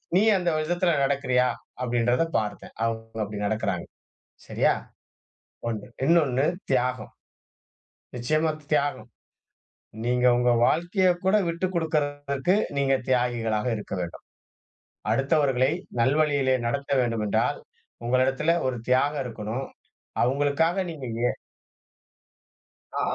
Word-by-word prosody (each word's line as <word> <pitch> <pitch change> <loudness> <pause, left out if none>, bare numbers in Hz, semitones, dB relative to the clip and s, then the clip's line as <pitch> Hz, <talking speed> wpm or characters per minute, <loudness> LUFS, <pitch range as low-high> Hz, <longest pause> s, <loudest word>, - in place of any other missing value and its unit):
நீ 190 - +5 0.2
அந்த 180 -2 0
விதத்துல 175 +2 +1
நடக்குறியா? 130 -2 +2 0.4
அப்டின்றத 120 +3 +2
பார்த்தேன். 105 -1 -4
அவங்க 115 0 -4
அப்டி 105 0 -6
நடக்குறாங்க. 100 -4 -1 0.6
சரியா? - - +2 1.0
ஒண்ணு 110 -3 -4 0.2
இன்னொன்னு 145 -5 +3 0.3
தியாகம். 125 -1 0 1.0
நிச்சியமா, 155 +6 +1 0.2
தியாகம். 145 -1 0 1.0
நீங்க 125 +1 +2
உங்க 125 0 +3
வாழ்க்கையக் 175 +3 +2
கூட 190 +3 +4
விட்டு 170 +3 -1
குடுக்குறதுகு, 145 -1 0 0.2
நீங்க 135 -1 +3
தியாகிகளாக 120 -3 +1
இருக்க 105 - -7
வேண்டும். 85 -1 -7 0.9
அடுத்தவர்களை 135 0 +2 0.3
நல்வழியிலே 140 0 +3
நடத்த 140 +4 -3
வேண்டுமென்றால், 115 -4 0 0.5
உங்களிடத்திலே 130 +6 +2
ஒரு 130 -1 -1
தியாகம் 140 +2 +2
இருக்கணும். 115 +2 -4 0.6
அவங்களுக்காக 145 +7 +1
நீங்க 140 -6 -7 0.2
எ - - -7 1.6
ஆ - - 0
135 Hz, 95 wpm, -26 LUFS, 120-155 Hz, 1.6 s, நீ